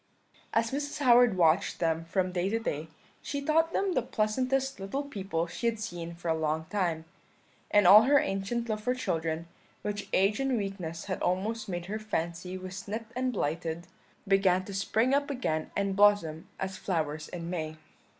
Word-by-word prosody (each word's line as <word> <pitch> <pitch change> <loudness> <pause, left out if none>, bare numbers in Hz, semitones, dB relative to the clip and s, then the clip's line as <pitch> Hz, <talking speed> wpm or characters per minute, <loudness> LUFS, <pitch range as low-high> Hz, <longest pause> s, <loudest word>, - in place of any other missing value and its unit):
"As 225 0 +1
Mrs. 285 +1 -3
Howard 245 -6 +5
watched 170 +2 +3
them 165 -1 0
from 185 +2 0
day 180 +1 0
to 225 - +1
day, 160 -9 -3 0.3
she 285 - -3
thought 320 +3 +2
them 390 0 0
the 255 - +2
pleasantest 255 +4 0
little 195 +9 -3
people 195 -11 -3
she 175 +7 -3
had 230 -2 0
seen 175 -6 -5
for 170 0 -8
a 165 - +3
long 160 0 -1
time; 170 -6 0 0.6
and 205 -2 +4
all 200 +4 +10
her 285 +2 +5
ancient 235 -2 -1
love 215 -1 -2
for 250 +4 0
children, 165 -7 -2 0.4
which 205 -1 -4
age 195 +4 +3
and 270 -2 +1
weakness 185 -5 -4
had 185 - -3
almost 205 +5 -1
made 175 -1 -3
her 210 +4 -4
fancy 180 -3 -3
was 185 +1 -7
nipped 220 +2 -5
and 255 0 0
blighted, 165 -3 -2 0.4
began 190 -2 +3
to 200 - -7
spring 220 +6 +1
up 285 +1 +2
again 160 - -2
and 200 -1 0
blossom 200 -6 +3
as 190 0 -3
flowers 155 -4 -2
in 170 -1 -6
May. 155 -3 -3
195 Hz, 180 wpm, -29 LUFS, 170-230 Hz, 0.6 s, all